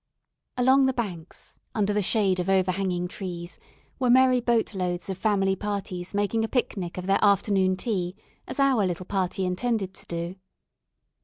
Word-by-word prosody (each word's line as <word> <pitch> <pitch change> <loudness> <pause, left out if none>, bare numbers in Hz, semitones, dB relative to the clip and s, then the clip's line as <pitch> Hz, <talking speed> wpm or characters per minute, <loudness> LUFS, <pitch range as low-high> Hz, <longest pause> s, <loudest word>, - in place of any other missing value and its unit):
Along 265 +2 +5
the 265 - 0
banks, 180 -8 -6 0.2
under 210 -1 +1
the 210 - +1
shade 195 -2 +2
of 180 +1 -1
overhanging 185 -1 +1
trees, 175 -2 -7 0.4
were 255 -2 +1
merry 255 0 +5
boat 235 -2 +1
loads 180 0 -2
of 190 - -5
family 195 -3 +2
parties 195 -3 -4
making 205 +2 +1
a - - 0
picnic 195 -8 -2
of 180 - -4
their 195 +2 +2
afternoon 195 -2 +3
tea, 185 -5 -2 0.3
as - - -5
our 270 -6 +4
little 180 -1 -2
party 190 -1 -1
intended 195 +1 -1
to - - -8
do. 170 +1 -4
195 Hz, 160 wpm, -26 LUFS, 180-225 Hz, 0.4 s, Along